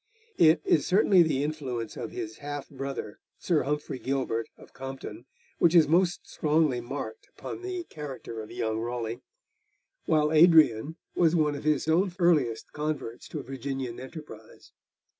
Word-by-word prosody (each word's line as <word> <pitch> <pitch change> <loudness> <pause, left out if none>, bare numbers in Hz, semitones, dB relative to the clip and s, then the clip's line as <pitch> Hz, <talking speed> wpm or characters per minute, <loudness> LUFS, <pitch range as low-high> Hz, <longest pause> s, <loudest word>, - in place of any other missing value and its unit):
It, 160 -1 +6
is 150 - +3
certainly 190 -1 +5
the 150 -4 +2
influence 130 -7 -4
of 115 - -5
his 110 0 -6
half 145 -1 -5
brother 135 -6 -6 0.2
Sir 165 -4 +1
Humphrey 145 -1 -3
Gilbert, 130 -4 -1
of - - -16
Compton, 135 -1 -8 0.3
which 170 +1 +4
is 160 -3 +7
most 175 +3 +2
strongly 150 -5 +1
marked 140 - -6
upon - - -7
the 370 -1 -4
character 140 - -7
of 110 - -10
young 110 -2 -2
Raleigh; 120 0 -4 0.9
while 155 -1 +3
Adrian 155 -5 +5 0.2
was 170 -1 +3
one 150 -3 +2
of 145 - -7
his 150 -1 +1
own 180 +4 +3
earliest 150 - +2
converts 150 -6 -4
to - - -6
Virginian 135 -2 -5
enterprise. 130 -5 -11
145 Hz, 145 wpm, -28 LUFS, 125-160 Hz, 0.9 s, is